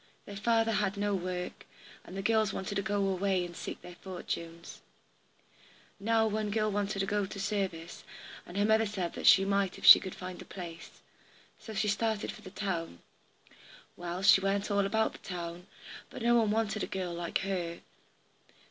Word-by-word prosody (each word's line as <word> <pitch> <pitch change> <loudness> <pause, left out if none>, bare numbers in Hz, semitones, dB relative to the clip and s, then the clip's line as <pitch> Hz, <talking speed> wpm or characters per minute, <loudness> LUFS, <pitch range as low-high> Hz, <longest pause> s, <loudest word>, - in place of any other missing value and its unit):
Their 200 - -8
father 225 +2 +2
had 205 -2 0
no 205 0 0
work, 180 -1 -4 0.4
and 190 - -9
the 195 - -3
girls 220 -2 +2
wanted 190 +1 -4
to 200 - 0
go 205 -1 0
away 190 -1 +1
and 175 -1 -9
seek - - -7
their 180 0 -11
fortunes. 170 -2 -6 1.2
Now 225 +2 +2
one 215 -1 -1
girl 215 0 +1
wanted 200 0 -1
to - - +1
go 205 0 0
to 200 - -8
service, 195 -5 -3 0.4
and 175 - -9
her 205 - +3
mother 220 +1 +4
said 190 -4 -3
she 195 - +8
might 195 -1 0
if - - -7
she - - +12
could 190 - -7
find 185 0 -7
a - - -7
place. 170 -3 -9 0.6
So 220 - -9
she 210 - +1
started 220 +1 0
for - - -12
the 195 - -10
town. 170 - -4 0.9
Well, 175 +2 -5
she 200 -1 +7
went 195 +2 0
all 200 -1 +2
about 220 +2 +1
the - - -12
town, 175 -1 -6 0.4
but - - -8
no 240 0 +4
one 230 -3 +4
wanted 215 -1 0
a - - -2
girl 185 -2 -3
like 170 0 -2
her. 180 -3 -3
195 Hz, 185 wpm, -31 LUFS, 180-210 Hz, 1.2 s, she